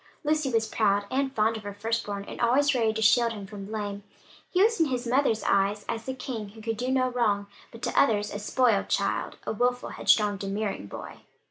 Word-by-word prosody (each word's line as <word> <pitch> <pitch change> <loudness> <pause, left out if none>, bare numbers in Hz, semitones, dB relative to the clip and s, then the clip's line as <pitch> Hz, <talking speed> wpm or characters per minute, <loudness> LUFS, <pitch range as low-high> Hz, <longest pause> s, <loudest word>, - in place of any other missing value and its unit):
Lucy 305 -2 +1
was 225 -1 +2
proud 205 -2 +1
and 270 0 0
fond 220 0 +2
of - - -8
her 205 -1 -7
first 225 +2 -2
born, 200 -1 -4
and - - -7
always 270 +5 +3
ready 230 -3 +2
to 220 0 -2
shield 230 +2 +4
him 205 -3 -7
from 195 0 -8
blame. 205 -1 -4 0.5
He 370 +1 +3
was 450 -2 +2
in 325 - +4
his 250 -2 -2
mother's 240 -3 +2
eyes 200 +1 +1
as 225 -1 -4
the 260 - -4
king, 235 -5 -5
who 220 +2 -13
could 225 -1 -2
do 250 +3 -2
no 260 -1 +2
wrong, 210 -5 +1 0.3
but 230 - -13
to - - -1
others 210 -5 +1
a 205 - -4
spoiled 220 0 +2
child, - - -1
a - - -2
wilful, 245 +3 0
headstrong, 210 -2 +2
domineering 195 - -3
boy. - - -9
225 Hz, 220 wpm, -27 LUFS, 205-250 Hz, 0.5 s, shield